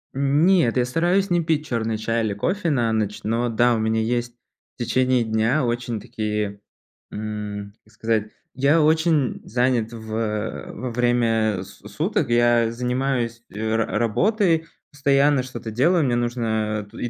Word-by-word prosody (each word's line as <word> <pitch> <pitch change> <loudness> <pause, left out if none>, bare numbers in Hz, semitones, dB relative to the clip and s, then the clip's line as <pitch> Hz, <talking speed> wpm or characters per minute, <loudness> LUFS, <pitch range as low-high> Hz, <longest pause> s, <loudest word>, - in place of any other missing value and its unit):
Н 140 +4 +2
нет, 170 -11 +3
я 125 - +3
стараюсь 175 +8 +1
не 175 -1 +2
пить 155 -2 0
черный 115 -3 -2
чай 115 +1 -1
или 105 -2 -1
кофе 180 - -1
на 120 -6 +1
ночь, 105 -2 -2
но 115 +2 0
да, 120 +2 +3
у 115 - 0
меня 110 0 +1
есть 120 +1 -2 0.4
в 120 - -3
течение 130 -1 +2
дня 110 +5 +1
очень 120 -1 -2
такие, 105 -3 -3 0.5
м, 105 -1 -5
как 110 - -25
сказать. 110 0 -1 0.2
Я 140 +5 +3
очень 160 -3 +2
занят 120 -1 0
в 110 -1 -9 0.6
во 125 +1 -5
время 115 -4 +1
с 95 - -13 0.2
суток. 150 - -1
Я 120 -1 +3
занимаюсь 125 -1 -1
ра 110 +1 -1
работой, 165 - +1 0.2
постоянно 140 -1 +3
что-то 125 -3 -7
делаю. 160 +9 +3
Мне 120 -2 +1
нужно 110 -3 -1
ту 115 - -11
и 120 - -2
120 Hz, 155 wpm, -23 LUFS, 110-140 Hz, 0.6 s, нет